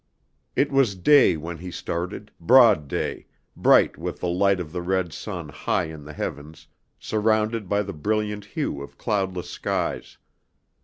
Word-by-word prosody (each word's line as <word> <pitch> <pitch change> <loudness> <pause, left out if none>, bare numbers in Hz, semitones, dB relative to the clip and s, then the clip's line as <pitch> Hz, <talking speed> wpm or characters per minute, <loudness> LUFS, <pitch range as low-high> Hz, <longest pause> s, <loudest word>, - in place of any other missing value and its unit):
It 140 - +2
was 135 -7 +3
day 130 - +5
when 80 +2 -7
he 90 +1 -7
started, 85 0 -5
broad 115 - +6
day, - - -3 0.3
bright - - +4
with - - -5
the 90 - -2
light 95 +2 +2
of 80 -4 -6
the 90 +1 -4
red 90 -2 -1
sun - - -6
high - - -1
in 75 -2 -10
the 75 - -9
heavens, 75 +2 -6 0.3
surrounded 110 -1 0
by 105 0 +2
the 100 0 -6
brilliant 105 +4 -2
hue 70 -7 -3
of 70 - -10
cloudless 95 -3 -2
skies. - - -3
95 Hz, 155 wpm, -24 LUFS, 85-105 Hz, 0.3 s, broad